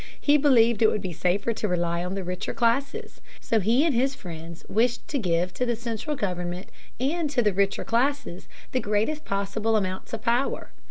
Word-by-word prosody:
He 290 - +4
believed 235 -6 +4
it 220 - +7
would 210 - -2
be 185 -2 -3
safer 195 +7 0
to 215 - -2
rely 170 -2 0
on 180 +2 -3
the 195 - -3
richer 180 +2 -4
classes. 240 +4 0 0.2
So 225 - +1
he 235 - +3
and 320 - +2
his 265 +3 +1
friends 165 -3 -9
wished 235 +3 +1
to 285 - 0
give 175 -3 0
to 250 - -2
the 240 -1 +1
central 235 +6 -3
government 180 -5 -3 0.3
and 300 +5 0
to 250 -4 +1
the 210 -2 +2
richer 195 +1 +1
classes 250 -5 -1 0.2
the 255 - +1
greatest 220 +8 0
possible 200 +3 0
amount 190 -3 -2
of 220 -1 -5
power. 240 +4 0
220 Hz, 195 wpm, -26 LUFS, 185-250 Hz, 0.3 s, it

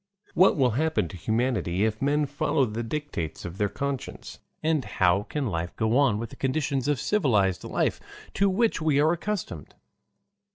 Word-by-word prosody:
What 180 0 +5
will 130 -3 +3
Happen 155 - 0
to - - -9
Humanity 110 -2 0
if 110 -1 -2
Men 145 +2 +2
Follow 145 0 +1
the 110 0 -4
Dictates 120 - -4
of 90 +3 -7
their 105 -1 +1
Conscience, 140 +1 -5 0.2
and 155 -3 +1
how 95 -3 +2
can 140 +6 -3
Life 85 -5 -3
go 110 +1 +1
on 135 -6 +4
with 115 +1 -5
the - - -10
Conditions 135 -1 -1
of 145 -3 +1
Civilized 110 - +1
Life - - -1 0.3
to 200 0 +2
which 220 0 +1
we 155 -3 +2
are 155 +2 +4
Accustomed? 175 - -4
130 Hz, 170 wpm, -26 LUFS, 105-150 Hz, 0.3 s, What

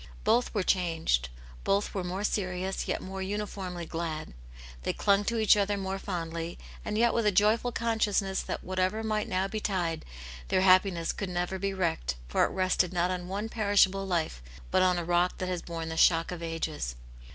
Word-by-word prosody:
Both 245 +1 +3
were 200 - +2
changed. 165 - +1 0.3
Both 200 +1 +1
were 190 - -2
more 185 +3 -3
serious, 190 -2 -1
yet - - -2
more 190 0 -5
uniformly 190 -3 -4
glad; 160 - -4 0.5
they - - -1
clung 200 0 +3
to 235 - 0
each 220 -2 +6
other 205 0 +1
more 195 0 -3
fondly, 170 -3 -4 0.3
and 210 - -2
yet 235 0 +4
with 230 -2 +2
a - - +5
joyful 215 +5 +3
consciousness 215 -4 0
that - - -5
whatever 185 +4 0
might 215 -1 -1
now 185 +1 +1
betide, 190 -6 -2 0.4
their 185 - +2
happiness 185 -2 +4
could 200 - -4
never 180 +1 -2
be 195 +1 -1
wrecked, 160 - -1
for - - +3
it - - -2
rested 185 -1 +1
not 180 0 +1
on 180 -1 -3
one 200 +4 -3
perishable 200 -3 +2
life, 165 - -1 0.3
but 185 - +4
on 180 -1 +4
a 175 - -2
rock 175 +1 +2
that 185 -1 -3
has 180 -2 -2
borne 165 -1 -5
the 160 - -4
shock 165 0 +4
of 175 -1 -5
ages. 160 - -3
185 Hz, 185 wpm, -29 LUFS, 175-200 Hz, 0.5 s, each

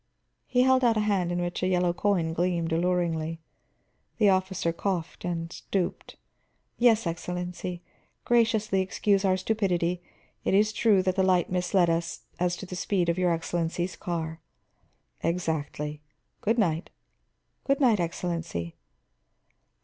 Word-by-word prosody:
He 250 0 +3
held 260 0 +4
out 230 -2 +4
a - - +2
hand 195 -4 +1
in 175 - -1
which 175 0 -3
a 185 - +1
yellow 180 -1 +2
coin 175 -4 +1
gleamed 170 -1 0
alluringly. 165 -2 0 0.8
The 210 -3 +5
officer 185 -3 +1
coughed, 175 -1 -3
and 170 -1 -3
stooped. 190 -3 -3 0.6
"Yes, 230 -3 +4
Excellency. 180 +1 -4 0.4
Graciously 220 -4 +2
excuse 195 +1 +1
our 185 -1 +3
stupidity; 180 -4 0 0.4
it - - +2
is 210 +2 +3
true 210 -4 +3
that 185 -1 0
the 190 - +2
light 185 -2 +2
misled 180 -1 +2
us 165 0 -2 0.2
as 180 0 +1
to - - -7
the 180 - -7
speed 180 -1 0
of 170 +2 0
your 180 -1 +3
Excellency's 170 +2 -2
car." 165 -2 -4 0.8
"Exactly. 150 -3 -2 0.4
Good 225 +3 +1
night." 170 -6 +1 0.7
"Good 275 0 +1
night, 240 -7 +4
Excellency." 165 - -3
180 Hz, 135 wpm, -27 LUFS, 170-195 Hz, 0.8 s, The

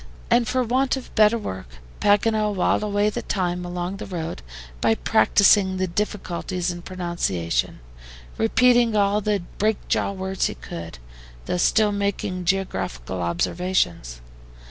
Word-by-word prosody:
And 240 -1 +4
for 255 0 +1
want 260 +3 +1
of 260 - -10
better 215 +1 +5
work, 95 - -7 0.3
Paganel 210 0 +2
whiled 185 - +2
away 210 0 +1
the - - -4
time 180 -2 -2
along 175 +2 -4
the - - -7
road 165 - -5 0.4
by 110 - +3
practising 200 - +4
the 185 - 0
difficulties 185 -1 -3
in 175 0 -7
pronunciation, 170 - -2 0.5
repeating 240 0 +3
all 205 0 +2
the 205 -3 0 0.2
break 215 0 +2
jaw - - +1
words 190 -1 -2
he - - -6
could, 85 -5 -8 0.5
though - - -1
still 210 +4 +3
making 200 -3 -2
geographical 95 - -2
observations. 85 - -1
190 Hz, 135 wpm, -23 LUFS, 175-210 Hz, 0.5 s, better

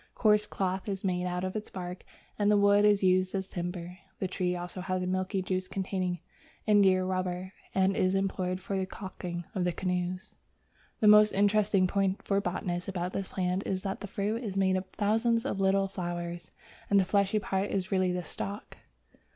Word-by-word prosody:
Coarse 210 -1 +3
cloth 190 +1 -2
is 195 -1 -3
made 180 -1 0
of 180 +2 -2
its 215 0 -4
bark, 180 -1 -6 0.4
and 205 0 +3
the 210 - +5
wood 205 0 +5
is 205 -1 +4
used 185 +1 +3
as 190 0 -1
timber. 175 0 -5 0.2
The 190 - -1
tree 180 -1 -1
also 175 +1 -5
has 185 0 -1
a - - -1
milky 185 +1 -1
juice 185 0 -2
containing 185 -3 -2 0.5
indiarubber, 185 -2 +2 0.2
and 190 0 +3
is 185 +1 +2
employed 185 -1 -1
for 190 0 -2
caulking 180 -3 -6
the 180 -2 0
canoes. 180 +1 -3 0.7
The 215 - +5
most 210 0 +7
interesting 205 -1 +3
point 195 +1 0
for 200 0 +1
botanists 180 0 -3
about 180 -1 -3
this 195 - -2
plant 185 0 -1
is 185 -1 -2
that 195 -1 -3
the 205 - -6
fruit 210 +5 -2
is 195 -4 -4
made 190 -1 +3
up 185 0 -1
of 185 - -35
thousands 225 +2 +1
of 195 - -2
little 195 0 +3
flowers, 175 -2 -5 0.4
and 200 - +5
the 190 - +3
fleshy 200 +2 +2
part 195 -1 -1
is 190 -2 -2
really 185 -2 +2
the 180 0 -2
stalk. 200 +5 -6
190 Hz, 185 wpm, -30 LUFS, 180-200 Hz, 0.7 s, most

